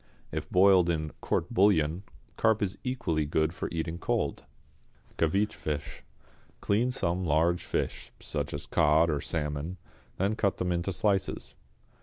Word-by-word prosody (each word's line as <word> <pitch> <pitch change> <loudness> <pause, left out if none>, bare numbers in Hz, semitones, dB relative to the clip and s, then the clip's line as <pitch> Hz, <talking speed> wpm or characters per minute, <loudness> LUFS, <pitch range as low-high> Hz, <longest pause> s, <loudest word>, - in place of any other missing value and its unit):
If - - -4
boiled 90 -2 +5
in 80 -2 -1
"court - - -1
bouillon," 90 -4 +3 0.3
carp 110 -1 +2
is 95 -1 -1
equally 90 - -1
good 80 +2 +1
for - - -4
eating 85 0 -3
cold. - - -1 0.7
=Caveach 100 +6 +2
Fish.= 75 -1 -4 0.6
Clean 110 +5 +1
some 95 -7 -1
large 85 +2 +2
fish, - - -3
such - - -3
as 70 - -5
cod 80 +1 +3
or 75 -1 -1
salmon, 75 +3 -3 0.4
then 100 +3 +1
cut 100 -3 0
them 90 0 -1
into 85 +2 -1
slices. 95 - -1
85 Hz, 140 wpm, -29 LUFS, 80-100 Hz, 0.7 s, boiled